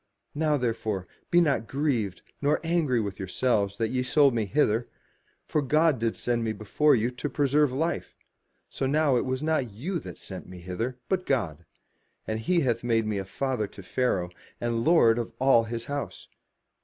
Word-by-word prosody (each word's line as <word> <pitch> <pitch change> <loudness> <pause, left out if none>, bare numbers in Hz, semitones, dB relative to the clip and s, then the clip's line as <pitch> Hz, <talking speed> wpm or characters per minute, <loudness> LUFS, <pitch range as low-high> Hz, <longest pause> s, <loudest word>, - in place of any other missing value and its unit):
Now 150 0 +1
therefore 110 -6 -2 0.2
be 175 - +5
not 140 -8 +1
grieved, 125 -10 -1 0.2
nor 145 +1 +2
angry 160 -7 +1
with 100 -3 -4
yourselves, 100 +1 0
that 115 -1 0
ye 125 0 0
sold 140 +1 +4
me 115 -2 0
hither: 115 0 +1 0.6
for 150 - 0
God 150 0 +3
did 115 0 0
send 120 -1 -1
me 110 -1 -1
before 110 +9 +2
you 120 +1 0
to 130 +4 -4
preserve 145 0 +2
life. 160 +6 -2 0.5
So 135 - -2
now 145 -1 +3
it 120 - +1
was 130 +2 -2
not 155 -6 +1
you 155 - -3
that - - -9
sent 95 -2 -8
me 90 - -9
hither, 100 +8 -4
but 185 -1 -1
God: 85 - -1 0.6
and 110 0 -2
he 170 +10 +2
hath 120 -4 0
made 115 -2 +2
me 105 -2 -1
a 95 - -4
father 125 +1 -2
to 100 - -12
Pharaoh, 90 -5 0 0.3
and 120 -1 -1
lord 120 -8 +5
of 115 - -4
all 130 -3 +5
his 115 0 -4
house. 145 0 -5
125 Hz, 180 wpm, -27 LUFS, 110-145 Hz, 0.6 s, be